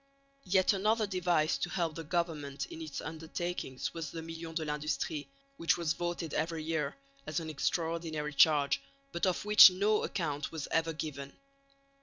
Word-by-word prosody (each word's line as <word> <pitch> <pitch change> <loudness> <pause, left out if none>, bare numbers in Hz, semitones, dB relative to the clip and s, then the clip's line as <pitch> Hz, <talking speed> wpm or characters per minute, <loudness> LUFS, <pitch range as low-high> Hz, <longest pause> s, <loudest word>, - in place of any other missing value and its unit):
Yet 185 +1 +3
another 215 +3 +2
device 180 -5 +1
to 175 - -2
help 170 -3 -1
the 165 - -6
government 155 -4 -2
in 165 - -9
its 155 -3 -5
undertakings 160 -3 -4
was 165 -4 -5
the 165 +1 -6
million 165 0 -7
de 160 -2 -1
l'industrie, 150 0 -2 0.3
which 165 - +2
was 170 -2 0
voted 175 -2 -3
every 165 -1 -1
year, 155 -3 -1 0.3
as 155 +3 -1
an 160 -1 -5
extraordinary 160 0 -2
charge, 145 -2 +4 0.3
but 170 +3 0
of 185 +2 -1
which 210 -1 +10
no 205 +4 +1
account 150 -5 -2
was 160 -3 -5
ever 165 0 +1
given. 140 -3 -6
165 Hz, 160 wpm, -32 LUFS, 150-175 Hz, 0.3 s, which